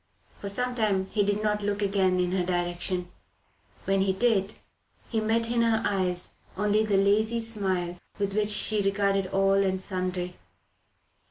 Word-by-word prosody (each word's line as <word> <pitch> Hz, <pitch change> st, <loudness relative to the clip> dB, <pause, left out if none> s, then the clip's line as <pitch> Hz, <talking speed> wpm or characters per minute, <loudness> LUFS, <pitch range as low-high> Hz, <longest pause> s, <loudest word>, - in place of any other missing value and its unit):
For 200 Hz, -, -5 dB
some 250 Hz, +5 st, -1 dB
time 210 Hz, -5 st, +1 dB
he 210 Hz, -, +1 dB
did 205 Hz, +1 st, 0 dB
not 210 Hz, -1 st, 0 dB
look 205 Hz, 0 st, -1 dB
again 190 Hz, -2 st, +2 dB
in 180 Hz, 0 st, +1 dB
her 185 Hz, -1 st, +1 dB
direction; 175 Hz, 0 st, -2 dB, 0.7 s
when 195 Hz, 0 st, +2 dB
he 190 Hz, 0 st, +2 dB
did, 210 Hz, -2 st, +1 dB, 0.5 s
he 225 Hz, -, 0 dB
met 225 Hz, +1 st, +1 dB
in 240 Hz, -1 st, +2 dB
her 230 Hz, -1 st, +2 dB
eyes 185 Hz, -3 st, -1 dB, 0.2 s
only 210 Hz, +1 st, +2 dB
the 205 Hz, -2 st, +1 dB
lazy 215 Hz, +4 st, +2 dB
smile 190 Hz, -6 st, -2 dB, 0.2 s
with 200 Hz, -1 st, -1 dB
which 210 Hz, 0 st, +1 dB
she 210 Hz, 0 st, +3 dB
regarded 195 Hz, -1 st, +1 dB
all 195 Hz, +1 st, +2 dB
and 190 Hz, -1 st, 0 dB
sundry. 185 Hz, -1 st, -3 dB
200 Hz, 160 wpm, -27 LUFS, 185-215 Hz, 0.7 s, she